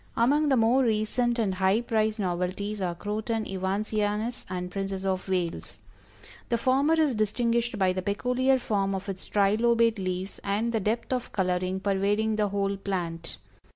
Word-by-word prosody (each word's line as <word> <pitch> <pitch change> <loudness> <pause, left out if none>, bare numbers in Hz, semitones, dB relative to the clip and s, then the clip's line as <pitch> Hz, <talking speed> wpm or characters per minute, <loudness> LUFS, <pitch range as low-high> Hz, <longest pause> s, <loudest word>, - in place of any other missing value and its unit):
Among 290 +6 +3
the 265 - +4
more 235 +4 +4
recent 235 +2 +1
and 210 -5 +1
high 190 +4 +2
priced 220 -2 0
novelties 190 +2 -2
are 175 -2 -1
Croton 215 +3 -2
Evansianus 210 +4 -2
and 180 -1 -4
Princess 195 0 -3
of 190 0 -1
Wales. 180 -3 -2 0.7
The 235 - +2
former 270 +6 +3
is 300 -4 +3
"distinguished 235 +2 0
by 190 -2 +2
the 185 - -2
peculiar 250 +7 +1
form 195 -5 0
of 190 +1 -5
its 190 -2 -5
trilobate 225 +2 +3
leaves 185 +1 -3
and 210 +4 0
the 225 - +2
depth 220 +5 -1
of 250 -2 -3
coloring 185 0 -1
pervading 205 +2 +1
the 210 -1 +2
whole 200 0 -1
plant. 170 -4 -4
205 Hz, 155 wpm, -27 LUFS, 190-230 Hz, 0.7 s, the